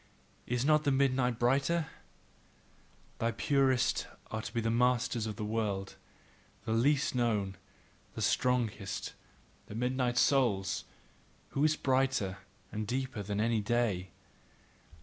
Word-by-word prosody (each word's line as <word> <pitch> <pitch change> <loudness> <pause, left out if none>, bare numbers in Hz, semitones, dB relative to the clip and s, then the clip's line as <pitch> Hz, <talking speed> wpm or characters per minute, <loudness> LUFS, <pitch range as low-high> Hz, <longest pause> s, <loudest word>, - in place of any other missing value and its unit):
Is 125 +1 0
not 155 0 +4
the 145 - +2
midnight 130 -3 +2
brighter? 140 +7 +2 1.3
The 115 0 0
purest 135 -3 +2 0.2
are 110 - -2
to 105 - -6
be 115 -1 -1
masters 120 -1 +1
of 105 - -4
the 105 -1 -4
world, 105 -3 -2 0.7
the - - -2
least 140 +5 +2
known, 105 -6 0 0.6
the - - -2
strongest, 115 -6 0 0.5
the 105 - -8
midnight 125 0 0
souls, 100 -10 +2 0.6
who 140 - -1
are 155 - +5
brighter 130 -8 +1 0.3
and 110 0 -3
deeper 130 -2 -2
than 100 +1 -3
any 115 0 +2
day. 105 -5 0
120 Hz, 120 wpm, -32 LUFS, 105-130 Hz, 1.3 s, are